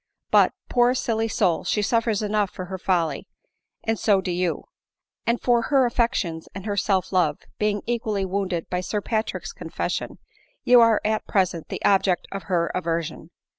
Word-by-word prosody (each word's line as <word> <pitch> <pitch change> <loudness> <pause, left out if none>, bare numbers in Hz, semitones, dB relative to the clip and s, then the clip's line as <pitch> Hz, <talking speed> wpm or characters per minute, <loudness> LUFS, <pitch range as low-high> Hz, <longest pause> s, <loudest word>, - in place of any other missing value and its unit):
But, - - +5
poor 245 0 +3
silly 225 -3 0
soul! 195 -6 +1
she 210 - 0
suffers 225 -1 +1
enough 210 -1 +1
for 185 - -7
her 190 +1 -6
folly, 175 -4 0 0.6
and 225 -1 -1
so 205 -3 +3
do 185 -1 -3
you; 175 -1 -1 0.8
for 240 -1 +3
her 265 +2 +3
affections 230 -9 -1
and 195 0 -7
her 205 -2 -1
self 195 -2 0
love, 170 -6 +2 0.2
being 210 -1 0
equally 220 -4 -1
wounded 190 -3 -2
by 180 - -2
Sir 205 +3 -2
Patrick's 220 +1 -3
confession, - - -4 0.5
you 245 -1 +7
are 230 -2 +4
at 215 0 0
present 185 -4 0
the - - -4
object 190 -2 +3
of 195 -3 -6
her 170 -2 +1
aversion. 165 -2 -3
200 Hz, 165 wpm, -24 LUFS, 180-225 Hz, 0.8 s, you